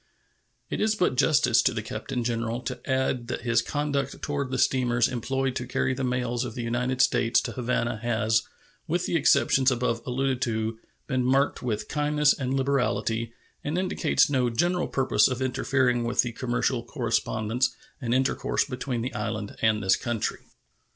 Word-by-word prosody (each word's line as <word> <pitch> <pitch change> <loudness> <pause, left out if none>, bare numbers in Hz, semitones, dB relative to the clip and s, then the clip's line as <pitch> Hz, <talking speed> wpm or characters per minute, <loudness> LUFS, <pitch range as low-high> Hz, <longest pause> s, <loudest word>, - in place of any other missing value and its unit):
It - - -2
is 215 0 +2
but 180 -9 +1
justice 145 +3 +4
to - - +1
the - - -3
Captain 125 -3 -4
General 115 0 -2
to 125 0 -5
add 130 -2 0
that 125 - -3
his 115 -1 +2
conduct 140 0 -2
toward 140 -2 -2
the 130 - -2
steamers 125 -2 +2
employed 130 +1 -2
to 125 - -5
carry 130 +1 0
the 135 +1 -3
mails 125 -1 -1
of 120 -3 -6
the 120 - -4
United 125 +2 0
States 115 -1 +3
to - - -4
Havana 120 -2 -1
has, 110 -1 +1 0.5
with - - 0
the - - -1
exceptions 130 -1 +4
above 120 -2 0
alluded 130 0 -1
to, 110 -1 -1 0.3
been 130 -3 0
marked 135 +3 +2
with 110 -4 -2
kindness 150 0 +2
and 130 -1 -2
liberality, 125 -4 0 0.3
and 150 +4 -2
indicates 185 -3 +2
no 130 -4 +1
general 175 +10 +1
purpose 135 -1 +3
of 130 -2 -3
interfering 130 -1 +1
with 120 +1 +2
the 120 - -3
commercial - - -1
correspondence 120 +3 -1 0.3
and 120 -2 -2
intercourse 130 +2 +1
between 125 -2 -3
the 130 - -4
island 105 -1 -4
and 110 -2 +2
this 95 - +4
country. 120 -3 -2
125 Hz, 170 wpm, -26 LUFS, 115-135 Hz, 0.5 s, justice